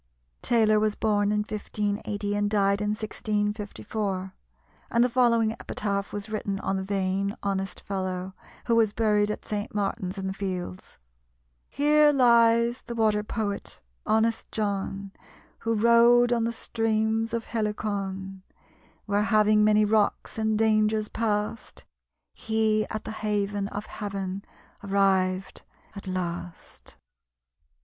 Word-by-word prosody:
Taylor 220 -3 +3
was 215 -1 +1
born 205 -2 +1
in 210 0 +1
1580, 205 -1 -3
and 205 0 +1
died 200 -1 +2
in 210 - 0
1654; 210 -2 -3 0.6
and 235 0 +3
the 250 - +2
following 230 -3 +3
epitaph 200 -2 -3
was 205 0 -5
written 210 -2 -3
on 195 - -1
the - - -2
vain, 195 0 -1
honest 195 -1 -2
fellow, 185 -1 -4 0.3
who 230 - +2
was 220 -3 +3
buried 210 -2 +2
at 210 - -4
St. 210 0 -4
Martin's 200 -2 -2
in 195 - -4
the 190 - -2
Fields: 185 - -5 0.7
"Here 295 +1 +4
lies 235 -2 +4
the 235 - -7
Water 215 -2 +2
poet, 210 -1 -4 0.2
honest 220 +1 +1
John, 200 -2 -3 0.5
Who 230 0 -1
rowed 235 +2 +5
on 230 -1 +1
the 230 - 0
streams 225 -1 -1
of 230 -1 -2
Helicon; 200 -3 -3 0.6
Where 205 0 +1
having 215 -1 +4
many 215 0 +4
rocks 215 +1 0
and 220 -1 +1
dangers 215 -1 +2
past, 215 0 -2 0.5
He 220 -1 0
at 215 - -4
the - - -6
haven 205 -2 -1
of 205 +1 -6
Heaven 195 -2 -5 0.4
arrived 195 -1 +1 0.3
at 200 -1 -9
last." 175 -2 -6
210 Hz, 125 wpm, -26 LUFS, 200-220 Hz, 0.7 s, rowed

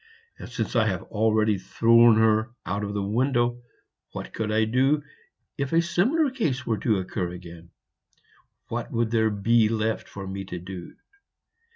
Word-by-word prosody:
And - - -8
since - - -4
I 110 -2 +3
have 95 -4 -2
already 110 -1 +1
thrown 115 +3 +5
her 110 +1 +3 0.2
out 100 +3 -2
of 100 0 -4
the 100 - -1
window, 120 +3 0 0.5
what - - -7
could 110 -1 -2
I 110 +1 +2
do 135 +6 +2 0.6
if 140 +2 -2
a 165 - +5
similar 245 - +1
case 160 - -2
were 110 -3 -1
to 110 -1 +1
occur 95 -1 -3
again? 85 -1 -11 1.0
What - - -4
would 115 -1 0
there 110 -1 +3
be 110 +2 +2
left 110 0 -1
for 100 -1 -8
me 95 +1 -5
to 90 -1 -6
do?" 90 0 -9
110 Hz, 165 wpm, -25 LUFS, 100-120 Hz, 1.0 s, thrown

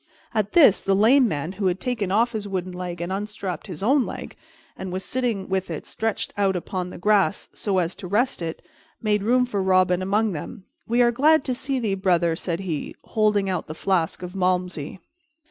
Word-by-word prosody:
At 210 -2 0
this, 285 - +6
the 195 - +2
lame 240 +6 +5
man, 155 -3 -3
who 195 0 -1
had 180 +1 0
taken 220 -6 -2
off 230 +4 +3
his 215 -3 -4
wooden 185 -2 -3
leg 180 -1 -5
and 175 +2 -3
unstrapped 200 -1 -4
his 180 -1 -7
own 265 +5 +4
leg, - - -7 0.4
and 190 - -6
was 185 +1 -4
sitting 235 -7 -1
with 190 -1 -1
it 160 - -5
stretched 225 -1 -3
out 195 -2 +1
upon 180 +1 -3
the - - -9
grass 205 +1 +2
so 200 -3 -1
as 175 0 +1
to 195 -3 -7
rest 225 +4 +1
it, 165 -1 -5 0.4
made 210 -2 +1
room 250 +4 +3
for 205 -5 -2
Robin 185 -1 +3
among 205 +3 +1
them. 180 +4 -7 0.2
"We 240 +2 +3
are 240 - +4
glad 300 +5 +4
to 255 - 0
see 265 +2 -2
thee, 220 -5 0
brother," 175 -3 +2
said 170 +1 -3
he, 165 -6 -4
holding 210 -2 +1
out 185 -2 -2
the 155 - -6
flask 180 -1 0
of 180 +1 -7
Malmsey. 180 -4 -1
195 Hz, 205 wpm, -24 LUFS, 180-220 Hz, 0.4 s, this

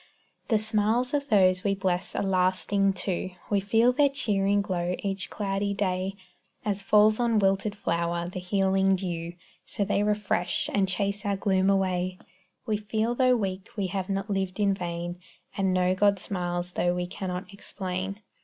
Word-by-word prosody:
The 225 - +3
smiles 220 +4 +1
of 285 -1 -1
those 185 -4 +4
we 195 -1 +1
bless 185 -2 -1
are - - 0
lasting, 195 +1 +2
too; 185 0 -3 0.2
We 205 - +3
feel 225 +5 +3
their 285 +2 +4
cheering 205 -7 +1
glow 180 -3 -1
each 195 -1 -3
cloudy 200 0 -2
day. 190 -1 -1 0.5
As 205 -1 0
falls 210 +2 +4
on 235 -2 +2
wilted 195 +1 +1
flower 170 -1 -1
the 185 +1 -5
healing 195 +1 +2
dew, 170 -2 -4 0.3
So 200 - -2
they 205 0 +1
refresh, 205 -4 0
and 195 -2 +2
chase 200 +2 -1
our 200 -2 0
gloom 190 -1 +2
away; 185 -2 +1 0.5
We 215 -1 0
feel 215 +2 -1
though 255 0 +4
weak 195 -3 -3
we 200 - 0
have 190 -1 -2
not 195 0 -1
lived 195 -1 -2
in 200 -1 +3
vain, 175 -1 -4 0.4
And 195 -1 +1
know 185 0 +2
God 200 +1 +3
smiles 175 -2 -3
tho' 175 0 0
we 180 0 -1
cannot 185 +1 -5
explain. 195 0 -5
195 Hz, 165 wpm, -27 LUFS, 185-205 Hz, 0.5 s, those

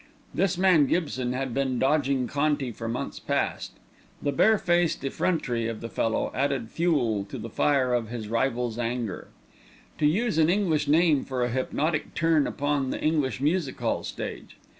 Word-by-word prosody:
This 190 -2 +1
man 180 -6 +5
Gibson 130 -7 -1
had 130 -1 -3
been 135 -1 0
dogging 135 -1 +2
Conti 145 -2 0
for 115 +1 -6
months 115 +2 -4
past. - - -2 0.5
The 145 - -1
barefaced 175 -1 +2
effrontery 125 -6 -1
of 115 -2 -4
the 115 - -6
fellow 115 -1 -1
added 135 -4 -1
fuel 130 - +1
to - - -7
the 115 - -7
fire 130 -2 +2
of 115 -3 0
his 115 -3 -5
rival's 120 0 -1
anger. 115 -4 -3 0.7
To 150 - +4
use 195 +2 +1
an 160 0 +4
English 180 -5 +1
name 155 -1 +4
for 130 -2 -2
a 120 - 0
hypnotic 150 +5 -1
turn 165 -3 +3
upon 145 -2 -1
the - - -3
English 150 -5 0
music 150 -1 0
hall - - 0
stage! - - -7
140 Hz, 160 wpm, -26 LUFS, 120-155 Hz, 0.7 s, man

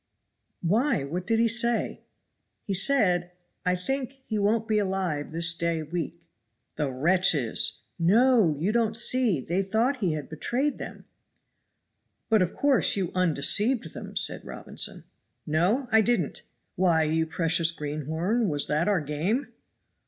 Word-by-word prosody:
"Why, 220 - +1
what 175 +6 -5
did 225 0 +2
he 230 +1 +3
say?" 235 +1 +1 0.6
"He 200 - -2
said, 180 -6 +2 0.3
'I 180 - +3
think 265 +8 -3
he 215 -2 -2
won't 220 +2 +1
be 215 -2 +2
alive 185 -7 -2
this 165 +1 +2
day 170 -1 -2
week! 170 +1 -5 0.3
'" 115 - -51
"The 150 -2 -1
wretches!" 150 -3 +1 0.2
"No! 210 - +4
you 175 +8 0
don't 225 -1 0
see 235 - +2
they 175 +8 -1
thought 225 +8 0
he 185 -9 -1
had 150 -2 -5
betrayed 255 - -2
them." - - -9 1.3
"But, 220 -2 +4
of 180 -1 -1
course, 280 -4 +3
you 185 -3 -2
undeceived 185 - +2
them," - - -9
said - - +2
Robinson. - - -3 0.4
"No! 180 - +1
I 220 0 +5
didn't. 240 +2 0 0.3
Why, 170 -4 +2
you 160 +1 0
precious 165 0 +1
greenhorn, 160 - -2
was 145 -2 0
that 155 +3 0
our 200 -5 +2
game?" 160 - -2
185 Hz, 145 wpm, -26 LUFS, 160-225 Hz, 1.3 s, I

